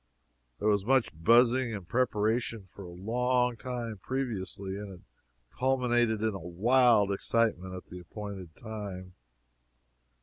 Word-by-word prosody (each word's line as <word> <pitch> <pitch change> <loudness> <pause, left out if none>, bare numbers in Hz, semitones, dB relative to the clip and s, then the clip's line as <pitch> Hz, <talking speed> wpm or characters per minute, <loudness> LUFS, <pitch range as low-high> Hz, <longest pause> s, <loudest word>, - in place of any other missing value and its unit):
There 105 - -1
was 100 -2 +3
much 130 +2 +2
buzzing 120 +7 +4
and 95 -4 -8
preparation 115 -1 0
for - - -10
a 95 - -8
long 125 +6 0
time 115 -3 -5
previously, 100 -6 -4
and 100 0 -7
it 90 - -16 0.5
culminated 120 -4 +1
in 110 -1 +1
a 95 - -5
wild 105 +4 +3
excitement 100 -3 0
at 90 - -8
the 90 - -9
appointed 95 -2 -8
time. 100 -5 -7
110 Hz, 130 wpm, -30 LUFS, 95-120 Hz, 0.5 s, buzzing